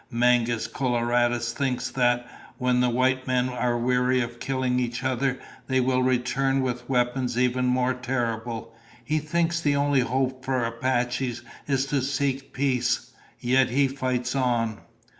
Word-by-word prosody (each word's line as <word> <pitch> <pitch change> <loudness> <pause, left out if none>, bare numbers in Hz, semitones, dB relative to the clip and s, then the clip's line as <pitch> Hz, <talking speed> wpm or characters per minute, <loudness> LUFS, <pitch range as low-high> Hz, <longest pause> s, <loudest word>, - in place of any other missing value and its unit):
Mangus 120 -1 +2
Coloradus 120 -1 0
thinks 130 -3 -2
that, 120 -1 +2 0.3
when 125 -1 +1
the 125 0 +3
white 130 +2 +1
men 130 0 +1
are 125 -1 0
weary 125 +1 +2
of 120 -1 -3
killing 130 -1 0
each 120 0 -2
other, 130 0 0 0.3
they 130 -1 +2
will 130 0 +2
return 130 +2 +1
with 125 -1 -3
weapons 125 -1 0
even 125 0 +2
more 125 0 +2
terrible. 120 -3 -3 0.3
He 155 +1 +1
thinks 170 +2 0
the 145 -3 +2
only 140 -1 +2
hope 130 +1 -1
for 130 -2 0
Apaches 120 +1 -1 0.2
is 135 -2 +1
to 140 0 0
seek 135 0 -1
peace. 130 -3 0 0.3
Yet 130 +1 +3
he 135 +3 +3
fights 130 -2 -2
on." 120 -5 0
125 Hz, 145 wpm, -25 LUFS, 120-130 Hz, 0.3 s, the